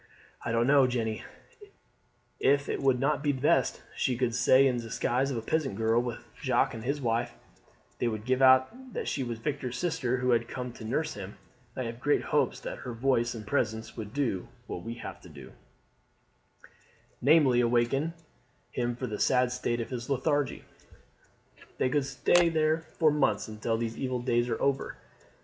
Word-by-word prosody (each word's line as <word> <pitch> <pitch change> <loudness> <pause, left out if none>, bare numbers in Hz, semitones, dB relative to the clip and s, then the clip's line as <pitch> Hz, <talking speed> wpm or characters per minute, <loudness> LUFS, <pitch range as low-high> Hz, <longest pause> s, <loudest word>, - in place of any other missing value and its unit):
"I - - -2
don't 115 +1 +2
know, 140 -1 +5
Jeanne, 115 -3 -2 1.2
if 140 +1 +3
it - - -2
would 135 -2 +3
not 145 +2 +1
be 145 0 +2
best. 130 +1 +1
She 125 -2 0
could 125 -2 0
stay 130 +3 +5
in 130 -2 +2
the - - -3
disguise 125 +4 0
of 130 - -2
a 115 - -4
peasant 140 -3 -1
girl 115 +2 +2
with 120 -1 -5 0.2
Jacques 130 -1 +2
and 115 -1 -7
his 140 +4 -1
wife; 120 -1 -1 0.7
they 120 - +1
would 110 -2 -3
give 130 +1 +1
out 130 - +4
that - - -3
she - - -1
was 120 -2 -4
Victor's 130 0 -3
sister 150 -7 0
who 125 0 +1
had 120 0 +2
come 125 0 -5
to 120 - -11
nurse 155 +8 -1
him. 100 0 -8 0.4
I 130 - -2
have 115 0 -6
great 145 +3 +2
hopes - - +1
that - - -6
her 125 - -6
voice 120 -1 +1
and 110 -2 -7
presence 110 -2 -1
would 110 -3 -6
do 120 -9 -1 0.2
what 90 - -6
we 115 +3 -6
have - - -8
to - - -13
do, - - -12 1.7
namely, 135 -3 +5
awaken 120 +7 +1 0.6
him 120 -1 -1
from 125 -1 -5
his 105 - 0
sad 125 -1 +3
state 120 -1 -1
of 115 - -6 0.2
lethargy. 140 +1 0 1.1
They - - +1
could 145 0 +1
stay 170 +6 +3
there 155 0 +2 0.2
for 155 -3 +4
months 135 -9 +1
until 110 +1 -2
these 115 0 -4
evil 130 -1 -1
days 120 0 +1
are 115 - -1
over. 140 -1 -1
125 Hz, 180 wpm, -29 LUFS, 115-140 Hz, 1.7 s, know